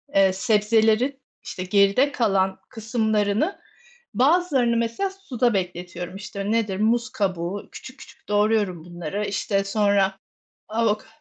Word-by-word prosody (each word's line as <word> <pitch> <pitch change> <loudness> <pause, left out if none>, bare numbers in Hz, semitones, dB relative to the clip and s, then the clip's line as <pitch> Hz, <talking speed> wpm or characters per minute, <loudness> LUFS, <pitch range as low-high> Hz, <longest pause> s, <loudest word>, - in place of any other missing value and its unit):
eee, 195 -1 +5
sebzelerin, 220 +6 +2 0.2
işte, 185 - -6
geride 200 +9 +3
kalan 195 -6 +1
kısımlarını, 220 - 0 0.5
bazılarını, 270 -5 +3
mesela, 230 +12 -1
suda 255 - -1
bekletiyorum, 180 -1 -4
işte, 200 +1 -5
nedir? 210 -4 0
Muz 235 +3 +1
kabuğu. 190 -4 -3
Küçük 260 +1 -11
küçük - - -16
doğruyorum 205 -5 +1
bunları, 175 +4 -4
işte, 195 0 -1
sonra 200 -1 +1 0.5
avok 215 -1 0
210 Hz, 110 wpm, -23 LUFS, 195-235 Hz, 0.5 s, eee